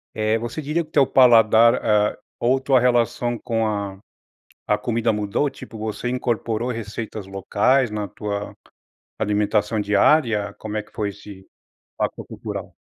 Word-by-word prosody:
eh, 110 +1 +1
você 120 +7 -5
diria 150 +4 -1
que 155 - -20
o - - -35
teu 140 -4 +4
paladar, 115 -2 +6
eh, 105 -3 +1 0.2
ou 125 +3 +2
tua 130 0 +3
relação 120 0 +1
com 115 -1 -1
a 100 -2 -3 0.7
a 105 0 +2
comida 115 0 0
mudou? 105 +7 0
Tipo, 135 -4 -9
você 110 +3 -4
incorporou 120 -1 -1
receitas 110 -2 -6
locais 105 +6 +1
na 105 -1 -3
tua 100 +1 -5 0.6
alimentação 105 +1 0
diária? 105 0 +2
Como 110 -1 -6
é 105 - -2
que - - -24
foi 105 -2 -2
esse 100 -1 -13 0.5
impacto - - -3
cultural? - - -7
110 Hz, 150 wpm, -22 LUFS, 105-120 Hz, 0.7 s, paladar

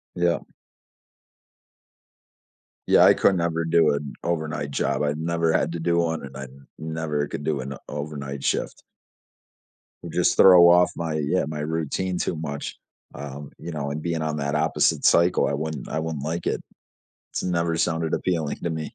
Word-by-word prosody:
Yeah. 85 -1 +1 2.5
Yeah, - - +6
I - - +7
could 95 - +3
never 85 -1 -1
do 80 -3 +4
an 70 -1 -4
overnight 80 -3 -2
job. - - 0
I've 75 0 0
never 85 0 0
had 80 - +1
to 85 - -4
do 85 +1 +1
one, 80 -2 0
and 65 -1 -9
I 70 - -6 0.3
never 80 -2 -2
could 75 - -6
do 75 -3 -1
an 70 +2 -6
overnight 70 -2 -5
shift. - - -2 1.3
Just - - +1
throw 90 -2 +8
off 90 +1 +5
my, 80 -2 -3
yeah, 75 +5 0
my 75 -1 -5
routine 80 +4 -2
too 85 - -1
much, 70 -2 -5 0.4
um, 70 0 -8
you 85 +2 -7
know, 70 -2 -3
and 75 +2 -4
being 85 -1 -2
on 75 -1 -2
that 70 +1 -2
opposite 75 - +1
cycle, 85 +1 +4
I - - -1
wouldn't 75 -2 -4
I 80 - -2
wouldn't 80 -3 -4
like 85 +2 -3
it. - - -1 0.7
It's - - -3
never 85 -2 0
sounded 80 -1 0
appealing 80 -5 -1
to 85 - 0
me. 80 -1 -5
80 Hz, 170 wpm, -24 LUFS, 75-85 Hz, 2.5 s, throw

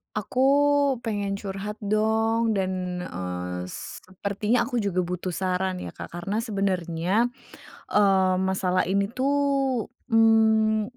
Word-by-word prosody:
Aku 250 +5 0 0.6
pengen 205 -4 -2
curhat 195 +1 -5
dong 220 +2 +1
dan, 185 -2 -2
eee 90 - -5
sepertinya 200 - -3
aku 245 +1 -2
juga 200 -5 0
butuh 180 +1 -4
saran 185 0 -1
ya, - - -5
Kak, - - -10
karena 175 +5 -3
sebenernya 195 0 0 0.6
eee 190 -2 +4
masalah 190 -1 +1
ini 200 +1 +2
tuh, 275 -2 +1 0.2
mhm, 220 -1 +4
200 Hz, 110 wpm, -25 LUFS, 185-225 Hz, 0.6 s, eee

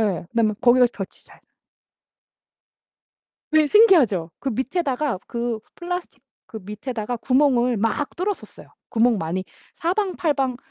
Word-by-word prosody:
예. 195 -6 -1
그다음에 225 -2 +1
거기가 250 +1 +6
볕이 195 -2 -8
잘 - - -19 2.1
예 310 -1 +6
신기하죠? 280 - +5
그 275 - -2
밑에다가 265 - -1
그 235 -2 -3 0.2
플라스틱 355 0 -5 0.3
그 220 - -8
밑에다가 215 +3 -4
구멍을 250 -1 +2
막 225 +7 -1
뚫었었어요. 390 +3 -5 0.2
구멍 230 -1 +2
많이 175 +3 -3 0.3
사방팔방 330 - 0
250 Hz, 270 characters per minute, -23 LUFS, 220-300 Hz, 2.1 s, 거기가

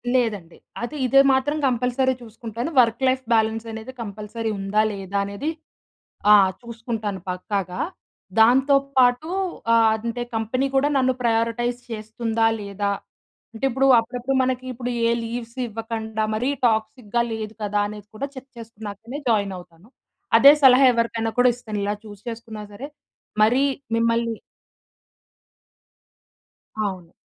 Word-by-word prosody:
లేదండి. 205 -9 -1 0.2
అది 260 +6 -4
ఇదే 275 +2 +6
మాత్రం 290 +3 +1
కంపల్సరీ 250 +1 +1
చూసుకుంటాను. 230 +3 -6
వర్క్ 230 +2 0
లైఫ్ 260 0 +1
బ్యాలెన్స్ 220 0 +1
అనేది 220 +3 -7
కంపల్సరీ 215 +2 -5
ఉందా 200 +2 +1
లేదా 195 0 -4
అనేది, 200 +10 -4 0.8
ఆ! - - +10 0.3
చూసుకుంటాను 225 -4 -5
పక్కాగా. 185 -1 -3 0.6
దాంతో 260 +5 +5 0.2
పాటు 250 +4 +4 0.5
ఆహ్, 225 -1 +5
అంటే, 240 +1 -2
కంపెనీ 230 +5 0
కూడా 270 +2 +4
నన్ను 260 -1 +2
ప్రయారిటైజ్ 235 +1 0
చేస్తుందా 225 +1 -1
లేదా? 200 0 -2 0.6
అంటే 225 +4 -3
ఇప్పుడు, 265 +2 +1
అప్పుడప్పుడు 250 +3 -3
మనకి 255 0 -1
ఇప్పుడు 245 +1 -5 0.2
ఏ - - +2
లీవ్స్ 235 +1 -6
ఇవ్వకండా 220 0 -4
మరీ 250 +5 0 0.2
టాక్సిక్‌గా 220 +1 -1
లేదు 220 -1 -5
కదా 205 0 0
అనేది 210 -1 -9
కూడా 280 +6 -3
చెక్ 265 +1 -10
చేసుకున్నాకనే 225 +3 -8
జాయిన్ 200 -3 +1
అవుతాను. 175 +2 -15 0.5
అదే 280 - +9
సలహా 265 +1 +8
ఎవరికైనా 230 -1 -1
కూడా 250 0 +6
ఇస్తాను 215 -4 -6
ఇలా 205 +1 0
చూజ్ 205 -2 -11
చేసుకున్నా 225 -2 -8
సరే 265 +7 -7 0.5
మరీ 245 +6 +4 0.3
మిమ్మల్ని 230 0 +1 2.4
అవును. 185 -5 -3
230 Hz, 125 wpm, -23 LUFS, 215-245 Hz, 2.4 s, ఆ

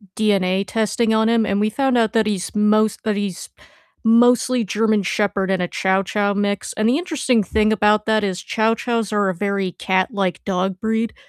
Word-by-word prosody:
DNA 195 -3 +1
testing 225 +1 0
on 220 +1 +2
him, 230 -2 +2
and 200 0 -1
we 215 +1 +1
found 265 +1 0
out 225 -1 +1
that 220 -1 +2
he's 195 -3 -3
most 215 0 +2
that 215 -2 -1
he's 200 -3 -5 0.5
mostly 245 +1 +3
German 215 +1 0
Shepherd 195 0 -1
and 185 -1 0
a 175 - -1
Chow 190 +2 0
Chow 205 +1 -1
mix, 200 0 -2
and 215 +1 0
the 265 - +2
interesting 265 - 0
thing 215 +2 +1
about 210 0 +2
that 215 -1 +2
is 185 -3 -2
Chow 220 0 0
Chows 230 -4 -2
are 205 -2 +1
a - - -1
very 200 -1 -2
cat-like 190 0 -1
dog 185 -1 -2
breed, 225 +1 -1
210 Hz, 190 wpm, -20 LUFS, 195-225 Hz, 0.5 s, mostly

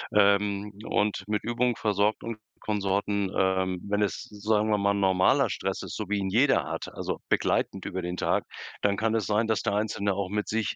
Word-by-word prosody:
Ähm, 100 0 +3
und 105 -3 0
mit 105 -1 -1
Übung 120 +1 +1
versorgt, 105 0 +1
und 115 -2 -4 0.2
Konsorten, 100 -1 0
ähm, 95 -1 +1
wenn 105 0 0
es, 105 - -1
sagen 105 +1 0
wir 105 - +3
mal 100 0 +2
normaler 95 -2 +3
Stress - - -3
ist, - - -6
so 105 -3 -5
wie 105 - +1
ihn 95 -1 -1
jeder 130 +7 +3
hat, - - -5
also, - - -3
begleitend - - +1
über 95 - -3
den 90 0 -4
Tag, - - +1 0.4
dann 100 -1 +2
kann 110 +1 +1
es 110 -3 0
sein, 110 +2 +2
dass 110 -1 +1
der - - -1
Einzelne 105 -1 0
auch 100 0 -2
mit 105 +1 -2
sich, 110 -1 -1
105 Hz, 200 wpm, -27 LUFS, 100-110 Hz, 0.4 s, Ähm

